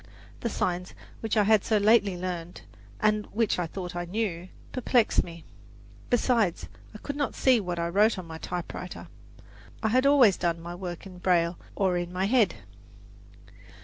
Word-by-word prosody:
The 235 Hz, -, -2 dB
signs, 180 Hz, -3 st, -2 dB, 0.2 s
which 225 Hz, 0 st, -2 dB
I 210 Hz, -, +5 dB
had 215 Hz, -1 st, +4 dB
so 220 Hz, -, +2 dB
lately 205 Hz, -2 st, +4 dB
learned, 175 Hz, -1 st, -5 dB, 0.4 s
and 215 Hz, 0 st, +2 dB
which 220 Hz, -3 st, 0 dB
I 175 Hz, -, -1 dB
thought 180 Hz, +1 st, -6 dB
I 175 Hz, 0 st, -3 dB
knew, 185 Hz, -2 st, -3 dB, 0.2 s
perplexed 245 Hz, -2 st, +2 dB
me. 170 Hz, -2 st, -11 dB, 0.6 s
Besides, 230 Hz, -6 st, +1 dB, 0.3 s
I -, -, -5 dB
could 285 Hz, +6 st, -6 dB
not 285 Hz, -1 st, -2 dB
see 255 Hz, -3 st, +4 dB
what 180 Hz, -4 st, -3 dB
I 170 Hz, 0 st, -1 dB
wrote 210 Hz, +5 st, +3 dB
on 185 Hz, -, -6 dB
my 160 Hz, -1 st, -8 dB
typewriter. 180 Hz, +1 st, -6 dB, 0.7 s
I 220 Hz, -, +2 dB
had 255 Hz, +4 st, +3 dB
always 260 Hz, -9 st, +6 dB
done 170 Hz, -1 st, -1 dB
my 170 Hz, +1 st, -7 dB
work 175 Hz, -1 st, -6 dB
in 185 Hz, -2 st, -11 dB
braille 175 Hz, -2 st, +1 dB, 0.2 s
or 190 Hz, -3 st, +1 dB
in 175 Hz, 0 st, -3 dB
my 185 Hz, +1 st, -1 dB
head. 220 Hz, -, +3 dB
190 Hz, 170 wpm, -27 LUFS, 175-220 Hz, 0.7 s, always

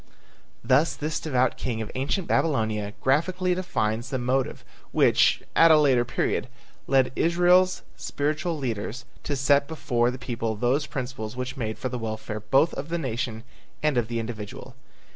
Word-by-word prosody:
'" -, -, -35 dB
Thus 150 Hz, +6 st, +4 dB
this 155 Hz, +1 st, -2 dB
devout 130 Hz, -5 st, +1 dB
king 120 Hz, -3 st, -3 dB
of 110 Hz, -, -5 dB
ancient 145 Hz, +8 st, -1 dB
Babylonia 110 Hz, -8 st, 0 dB
graphically 180 Hz, +7 st, +1 dB
defines 120 Hz, -10 st, -1 dB
the 130 Hz, -, -1 dB
motive 130 Hz, +1 st, -1 dB, 0.3 s
which, -, -, +4 dB
at 165 Hz, -, +7 dB
a 160 Hz, -, +7 dB
later 135 Hz, -5 st, +4 dB
period, 120 Hz, +1 st, -1 dB, 0.4 s
led 135 Hz, -2 st, +3 dB
Israel's 180 Hz, +2 st, +3 dB
spiritual 155 Hz, +3 st, -2 dB
leaders 120 Hz, -2 st, -4 dB, 0.2 s
to 145 Hz, -, -3 dB
set 140 Hz, +1 st, +3 dB
before 120 Hz, -7 st, 0 dB
the 125 Hz, -, -5 dB
people 115 Hz, -3 st, -3 dB
those 125 Hz, +6 st, +1 dB
principles 125 Hz, -4 st, -5 dB
which 125 Hz, +2 st, -4 dB
made 110 Hz, -5 st, -3 dB
for 130 Hz, -, -3 dB
the 125 Hz, -1 st, -4 dB
welfare 110 Hz, -1 st, -4 dB
both 135 Hz, +9 st, +2 dB
of 145 Hz, +3 st, -5 dB
the 170 Hz, -, -1 dB
nation 120 Hz, -6 st, -3 dB, 0.4 s
and 150 Hz, -2 st, +2 dB
of 120 Hz, -3 st, +1 dB
the 115 Hz, 0 st, -2 dB
individual. 115 Hz, +3 st, -7 dB
130 Hz, 160 wpm, -26 LUFS, 115-150 Hz, 0.4 s, at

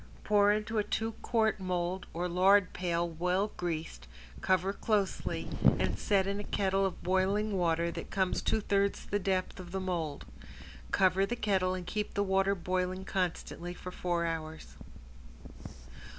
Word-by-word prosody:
Pour 205 Hz, -1 st, +4 dB
into 215 Hz, +1 st, 0 dB
a -, -, +2 dB
two 225 Hz, +2 st, -1 dB
quart 220 Hz, -3 st, +1 dB
mold 180 Hz, 0 st, -2 dB
or 175 Hz, +2 st, -2 dB
lard 185 Hz, +2 st, +4 dB
pail 175 Hz, -1 st, 0 dB
well 180 Hz, +5 st, 0 dB
greased, 160 Hz, -, -4 dB, 0.3 s
cover 185 Hz, +1 st, +2 dB
closely 205 Hz, -3 st, -1 dB, 0.3 s
and -, -, -1 dB
set 195 Hz, -3 st, +2 dB
in 200 Hz, +1 st, -2 dB
a -, -, -4 dB
kettle 195 Hz, -1 st, +1 dB
of 185 Hz, -, -8 dB
boiling 195 Hz, +3 st, +1 dB
water 170 Hz, -1 st, +1 dB
that -, -, -7 dB
comes 190 Hz, -2 st, 0 dB
two 220 Hz, -, +1 dB
thirds 200 Hz, 0 st, 0 dB
the 205 Hz, -, -1 dB
depth 190 Hz, -1 st, -1 dB
of 175 Hz, -1 st, -9 dB
the 190 Hz, -, -2 dB
mold. 170 Hz, -6 st, -3 dB, 0.6 s
Cover 190 Hz, 0 st, +3 dB
the 240 Hz, -, -2 dB
kettle 190 Hz, -5 st, +1 dB
and 180 Hz, -1 st, -6 dB
keep 210 Hz, +3 st, -3 dB
the 200 Hz, -, +2 dB
water 195 Hz, 0 st, +2 dB
boiling 185 Hz, +1 st, -2 dB
constantly 175 Hz, -1 st, -3 dB
for 180 Hz, -, -8 dB
four 175 Hz, -2 st, -1 dB
hours. 160 Hz, -1 st, -4 dB
185 Hz, 155 wpm, -31 LUFS, 175-200 Hz, 0.6 s, Pour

